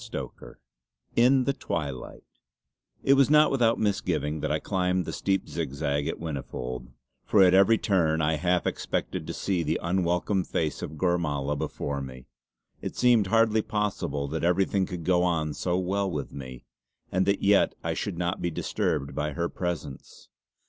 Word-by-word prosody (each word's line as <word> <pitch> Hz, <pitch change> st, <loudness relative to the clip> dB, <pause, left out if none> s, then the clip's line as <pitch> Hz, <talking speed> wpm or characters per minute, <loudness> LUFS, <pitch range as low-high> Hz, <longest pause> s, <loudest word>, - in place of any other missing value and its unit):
CHAPTER -, -, -7 dB, 0.6 s
XI -, -, +4 dB
IN 130 Hz, +1 st, +5 dB
THE 140 Hz, -, +1 dB
TWILIGHT 70 Hz, -, -5 dB, 0.8 s
It 135 Hz, -, +5 dB
was 140 Hz, 0 st, +4 dB
not 150 Hz, 0 st, +6 dB
without 120 Hz, -4 st, +3 dB
misgiving 85 Hz, -7 st, -1 dB
that 75 Hz, 0 st, -2 dB
I 75 Hz, -, +2 dB
climbed 90 Hz, 0 st, 0 dB
the -, -, -5 dB
steep 95 Hz, 0 st, 0 dB
zigzag 70 Hz, +1 st, -2 dB
at -, -, -2 dB
Whinnyfold, 65 Hz, -5 st, -5 dB, 0.4 s
for 100 Hz, -, +5 dB
at 90 Hz, -1 st, +5 dB
every 100 Hz, +4 st, +6 dB
turn 80 Hz, -7 st, +1 dB
I 80 Hz, 0 st, +1 dB
half 90 Hz, +2 st, +1 dB
expected -, -, -2 dB
to -, -, -4 dB
see 95 Hz, -3 st, -1 dB
the -, -, -1 dB
unwelcome 90 Hz, +2 st, 0 dB
face 80 Hz, -3 st, -2 dB
of 75 Hz, -, -6 dB
Gormala 75 Hz, -5 st, 0 dB
before 70 Hz, 0 st, -3 dB
me. 65 Hz, -1 st, -9 dB, 0.6 s
It -, -, -5 dB
seemed 120 Hz, -5 st, +4 dB
hardly 110 Hz, +1 st, +3 dB
possible 105 Hz, -10 st, -2 dB
that 80 Hz, +2 st, -3 dB
everything 95 Hz, +2 st, +2 dB
could 90 Hz, -2 st, -6 dB
go 90 Hz, -1 st, +3 dB
on 80 Hz, -4 st, 0 dB
so 90 Hz, +4 st, -1 dB
well 95 Hz, +2 st, 0 dB
with 75 Hz, -6 st, -4 dB
me, 65 Hz, -2 st, -9 dB, 0.5 s
and 95 Hz, +1 st, +1 dB
that 100 Hz, 0 st, +1 dB
yet 100 Hz, 0 st, +4 dB
I -, -, -1 dB
should -, -, -3 dB
not 90 Hz, +1 st, -2 dB
be 85 Hz, -, 0 dB
disturbed 70 Hz, -3 st, -2 dB
by 75 Hz, 0 st, -2 dB
her 85 Hz, +2 st, -1 dB
presence. 85 Hz, -6 st, -6 dB
90 Hz, 170 wpm, -27 LUFS, 75-100 Hz, 0.8 s, not